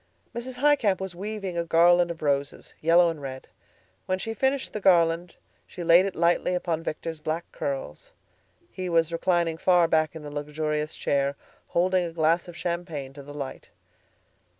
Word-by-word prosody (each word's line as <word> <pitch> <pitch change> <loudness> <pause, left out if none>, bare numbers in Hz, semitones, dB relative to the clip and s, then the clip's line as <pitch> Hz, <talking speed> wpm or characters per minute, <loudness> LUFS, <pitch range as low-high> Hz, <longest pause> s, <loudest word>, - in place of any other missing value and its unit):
Mrs. 245 +2 -5
Highcamp 255 -8 +3
was 190 -1 -5
weaving 195 -2 -4
a - - 0
garland 175 +1 +4
of 165 -2 -6
roses, 140 -1 -1
yellow 170 +1 +5
and 155 -3 -9
red. 130 -1 -7 0.6
When 185 - +1
she 225 +4 -4
had 225 - -9
finished 265 0 0
the 215 - -4
garland, 170 -2 +3 0.3
she 175 - -7
laid 170 +3 +6
it 195 - -5
lightly 175 +2 +2
upon 170 -2 -1
Victor's 160 0 -5
black 155 +3 -3
curls. 140 - -5 0.6
He 185 -1 -4
was 165 -1 +2
reclining 170 -1 +1
far 175 -2 +4
back 155 -1 +1
in 160 - -8
the 145 - -7
luxurious 150 +1 -3
chair, 140 0 0 0.3
holding 185 +1 +2
a 170 - -4
glass 165 +2 +2
of 175 -1 -10
champagne 170 -6 -4
to 140 - -10
the 140 +1 -11
light. 140 -2 -7
170 Hz, 175 wpm, -26 LUFS, 155-185 Hz, 0.6 s, laid